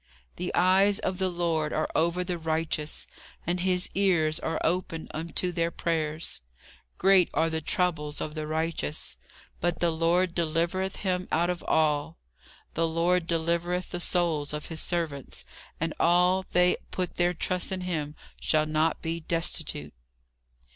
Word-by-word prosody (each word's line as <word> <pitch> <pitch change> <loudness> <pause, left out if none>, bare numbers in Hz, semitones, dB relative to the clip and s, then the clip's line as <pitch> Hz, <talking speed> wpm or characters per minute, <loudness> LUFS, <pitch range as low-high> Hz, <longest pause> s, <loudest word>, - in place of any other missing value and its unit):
The 180 +1 -2
eyes 190 +3 +5
of 185 - -2
the 190 -1 +2
Lord 165 -3 0
are 155 - 0
over 170 +2 +1
the 180 -1 -3
righteous: 160 -1 -2 0.4
and 175 +1 0
his 180 0 +1
ears 170 -5 +2
are 165 - -2
open 165 -1 -1
unto 170 +3 -2
their 170 -1 0
prayers. 160 - -2 0.6
Great 190 -2 +5
are 165 0 +2
the 160 0 -1
troubles 150 -3 0
of 150 - -4
the 155 -1 -4
righteous; 160 - -2 0.4
but 175 0 0
the 170 -1 +2
Lord 170 +2 +2
delivereth 170 +3 0
him 185 -1 0
out 175 +2 +2
of 175 - -5
all. 155 0 +1 0.6
The 165 +1 +1
Lord 165 +1 +1
delivereth 170 +2 0
the 175 - -3
souls 165 -5 +1
of 150 0 -5
his 160 -1 -3
servants: 160 -6 -3 0.3
and 165 -1 -1
all 180 +2 +4
they 180 0 +5
that - - -30
put 185 -1 -2
their 175 0 +2
trust 180 +3 -1
in 190 -1 -2
him 155 -5 -3 0.2
shall 155 -1 +2
not 155 +1 +1
be 165 0 -2
destitute." 160 - -1
170 Hz, 155 wpm, -28 LUFS, 160-180 Hz, 0.6 s, eyes